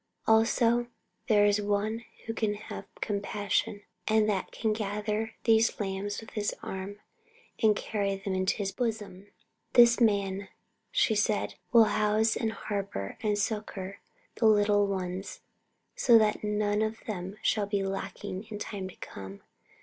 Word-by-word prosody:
Also 230 Hz, +2 st, +3 dB, 0.4 s
there 205 Hz, -2 st, +5 dB
is 205 Hz, 0 st, +3 dB
One 205 Hz, +2 st, 0 dB
here 230 Hz, -, -21 dB
who 225 Hz, -, -3 dB
can 215 Hz, -2 st, 0 dB
have 210 Hz, -, -8 dB, 0.2 s
compassion 205 Hz, 0 st, -1 dB, 0.2 s
and 215 Hz, -1 st, +4 dB
that 200 Hz, -3 st, -1 dB
can 220 Hz, -2 st, 0 dB
gather 210 Hz, +1 st, -2 dB
these 225 Hz, 0 st, +3 dB
lambs 200 Hz, 0 st, -3 dB
with 225 Hz, -, -11 dB
His 210 Hz, -1 st, -2 dB
arm 195 Hz, +2 st, -6 dB, 0.6 s
and 215 Hz, -2 st, +5 dB
carry 200 Hz, -2 st, -1 dB
them 195 Hz, 0 st, -4 dB
in 185 Hz, 0 st, -1 dB
His 195 Hz, 0 st, 0 dB
bosom. 210 Hz, -5 st, -4 dB, 0.5 s
This 235 Hz, 0 st, +7 dB
Man, 200 Hz, -3 st, +2 dB, 0.4 s
she -, -, +2 dB
said, 210 Hz, 0 st, +1 dB, 0.2 s
will 235 Hz, -2 st, +8 dB
house 215 Hz, +1 st, +2 dB
and 225 Hz, -2 st, -1 dB
harbour 200 Hz, -, -4 dB
and 210 Hz, -1 st, +1 dB
succour 200 Hz, -2 st, -3 dB, 0.4 s
the 225 Hz, -, +4 dB
little 205 Hz, -1 st, +4 dB
ones, 185 Hz, -1 st, -4 dB, 0.5 s
so 235 Hz, -2 st, +6 dB
that 215 Hz, -1 st, +2 dB
none 210 Hz, 0 st, +1 dB
of 220 Hz, +1 st, -2 dB
them 190 Hz, -1 st, -5 dB
shall 210 Hz, -2 st, +1 dB
be 200 Hz, -1 st, 0 dB
lacking 195 Hz, +1 st, -4 dB
in 210 Hz, -, -5 dB
time 195 Hz, -2 st, -5 dB
to -, -, -13 dB
come. 95 Hz, 0 st, -9 dB
210 Hz, 150 wpm, -29 LUFS, 200-220 Hz, 0.6 s, will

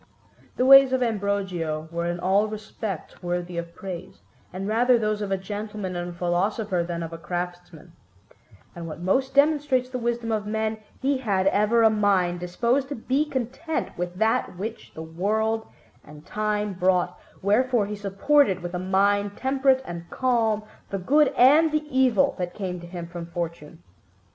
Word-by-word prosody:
The 255 Hz, -, +2 dB
ways 270 Hz, 0 st, +8 dB
of 255 Hz, -1 st, +2 dB
Ambrogio 195 Hz, -8 st, -2 dB
were 170 Hz, 0 st, -2 dB
in 175 Hz, 0 st, -2 dB
all 195 Hz, +4 st, +2 dB
respects 215 Hz, -4 st, -6 dB
worthy 175 Hz, -1 st, -3 dB
of 170 Hz, 0 st, -8 dB
praise, 185 Hz, -3 st, -8 dB, 0.3 s
and 190 Hz, +2 st, -5 dB
rather 240 Hz, +3 st, +4 dB
those 215 Hz, -1 st, -1 dB
of 205 Hz, -, -3 dB
a 195 Hz, -, +2 dB
gentleman 205 Hz, -1 st, -5 dB
and 175 Hz, 0 st, -3 dB
a -, -, -6 dB
philosopher 180 Hz, +3 st, 0 dB
than 170 Hz, -1 st, -4 dB
of 165 Hz, 0 st, -6 dB
a 165 Hz, -, -7 dB
craftsman; 175 Hz, 0 st, -6 dB, 0.8 s
and 170 Hz, -1 st, -6 dB
what 160 Hz, -, -7 dB
most 260 Hz, +10 st, 0 dB
demonstrates 285 Hz, -3 st, +3 dB
the 255 Hz, -, -3 dB
wisdom 235 Hz, -1 st, -2 dB
of 210 Hz, -1 st, -1 dB
men, 220 Hz, 0 st, -1 dB, 0.2 s
he 275 Hz, 0 st, +1 dB
had 200 Hz, -7 st, 0 dB
ever 210 Hz, +4 st, +3 dB
a 220 Hz, -, +6 dB
mind 195 Hz, -4 st, +2 dB
disposed 235 Hz, +10 st, 0 dB
to 290 Hz, -, -3 dB
be 265 Hz, +6 st, 0 dB
content 275 Hz, +3 st, -3 dB
with 175 Hz, 0 st, -4 dB
that 220 Hz, -2 st, 0 dB
which 220 Hz, +4 st, -6 dB
the 160 Hz, -, -6 dB
world 220 Hz, +7 st, -1 dB, 0.4 s
and 150 Hz, +1 st, -14 dB
time 210 Hz, -1 st, -1 dB
brought, 180 Hz, -1 st, +1 dB, 0.2 s
wherefore 230 Hz, +2 st, +2 dB
he 210 Hz, +1 st, -5 dB
supported 200 Hz, 0 st, +2 dB
with 175 Hz, 0 st, -5 dB
a 180 Hz, -, -2 dB
mind 200 Hz, +2 st, +1 dB
temperate 265 Hz, 0 st, +2 dB
and 170 Hz, 0 st, -7 dB
calm 230 Hz, -4 st, +1 dB, 0.3 s
the 195 Hz, -, -2 dB
good 285 Hz, +11 st, +4 dB
and 300 Hz, +6 st, +6 dB
the 305 Hz, 0 st, 0 dB
evil 255 Hz, -6 st, +4 dB
that 175 Hz, -1 st, -3 dB
came 185 Hz, -3 st, -4 dB
to 175 Hz, -, -10 dB
him 175 Hz, -1 st, -6 dB
from 170 Hz, 0 st, -7 dB
fortune. 170 Hz, -2 st, -6 dB
205 Hz, 170 wpm, -25 LUFS, 175-235 Hz, 0.8 s, ways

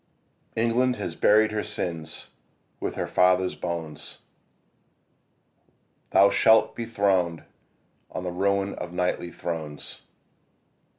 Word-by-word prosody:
ENGLAND 120 Hz, +3 st, +2 dB
has 100 Hz, -6 st, -4 dB
buried 110 Hz, +3 st, +4 dB
her 105 Hz, 0 st, -1 dB
sins 80 Hz, -5 st, -4 dB, 0.5 s
with -, -, -3 dB
her -, -, -2 dB
fathers' 90 Hz, 0 st, +3 dB
bones. 80 Hz, -4 st, -5 dB, 1.9 s
Thou 100 Hz, +1 st, +6 dB
shalt 110 Hz, 0 st, +4 dB
be 120 Hz, -, -4 dB
throned 95 Hz, -7 st, +1 dB, 0.7 s
on 90 Hz, -, -5 dB
the 90 Hz, -, -3 dB
ruin 100 Hz, +2 st, 0 dB
of 90 Hz, -, -6 dB
kingly 90 Hz, 0 st, -1 dB
thrones. 80 Hz, -4 st, -5 dB
90 Hz, 105 wpm, -26 LUFS, 85-105 Hz, 1.9 s, Thou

